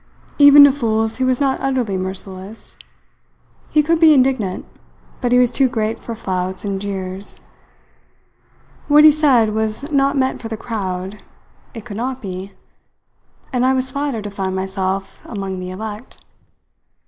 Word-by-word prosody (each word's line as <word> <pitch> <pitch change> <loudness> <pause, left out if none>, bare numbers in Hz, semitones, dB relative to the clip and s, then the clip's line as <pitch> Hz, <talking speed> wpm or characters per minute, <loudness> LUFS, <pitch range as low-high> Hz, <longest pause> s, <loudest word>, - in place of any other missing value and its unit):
Even 285 0 +9
to 285 - +7
fools 225 -4 -1
he 260 - -1
was 255 -1 +1
not 275 -2 0
utterly 255 -7 -1
merciless. 190 +2 -6 0.9
He 300 - +3
could 330 +2 +1
be 320 -2 +7
indignant, 255 -8 +1 0.6
but 245 -2 0
he 250 - +5
was 250 -1 +4
too 270 -2 +2
great 225 -1 -2
for 230 - -7
flouts 185 -2 -4
and 195 -1 -3
jeers. 195 -1 -3 1.5
What 295 +1 +6
he 310 - +9
said 265 -8 +3
was 220 +7 -2
not 275 0 +2
meant 260 -1 0
for 230 - -6
the 225 -1 -5
crowd; 195 -3 -5 0.5
it 225 - -8
could 210 -4 -7
not 255 +2 -3
be; 190 -2 -7 1.0
and 250 -1 +1
I 260 +1 +3
was 260 0 -1
flattered 280 -5 -3
to 205 - -6
find 190 -1 -3
myself 190 0 -3
among 195 -3 -5
the 180 0 -6
elect. 215 +5 -8
220 Hz, 155 wpm, -19 LUFS, 195-265 Hz, 1.5 s, Even